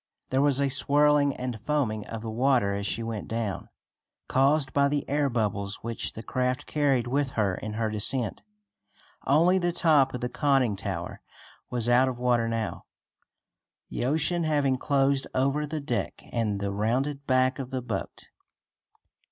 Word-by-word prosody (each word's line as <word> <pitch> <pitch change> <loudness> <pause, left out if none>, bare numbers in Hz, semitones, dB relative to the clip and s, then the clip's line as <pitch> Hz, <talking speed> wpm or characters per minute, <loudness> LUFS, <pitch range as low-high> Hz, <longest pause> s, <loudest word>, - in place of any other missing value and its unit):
There 130 +1 +2
was 140 -2 +2
a 140 - +2
swirling 145 +1 +3
and 125 -4 -5
foaming 115 -7 -1
of 115 -1 -6
the 110 - -4
water 120 -3 +2
as 100 0 -2
she 115 - -1
went 115 -2 -5
down, 110 -4 -3 0.6
caused 135 +1 +2
by 140 0 +4
the 145 0 -1
air 145 0 +1
bubbles 105 -4 -1
which 115 0 -3
the 110 - -8
craft 125 +1 -1
carried 140 -5 +1
with 135 +2 -1
her 100 -4 +2
in 105 +3 -5
her 110 +1 -1
descent. 110 +1 -1 0.9
Only 170 +7 +4
the 175 -1 0
top 150 -6 +3
of 125 - -5
the 125 - -1
conning 135 -4 +1
tower 95 -3 -5 0.5
was 120 -2 -2
out 125 +2 +5
of 130 -2 -3
water 120 -2 +2
now, 115 -6 -3 1.0
the - - -3
ocean 160 +5 +1
having 145 -4 +1
closed 135 -1 +1
over 140 +3 +1
the 155 +1 -3
deck 125 -5 -3
and 110 -4 -1
the 100 0 -2
rounded 130 +8 -1
back 130 0 +2
of 130 -2 -5
the 130 -2 -4
boat. 105 -5 -5
130 Hz, 165 wpm, -27 LUFS, 115-140 Hz, 1.0 s, out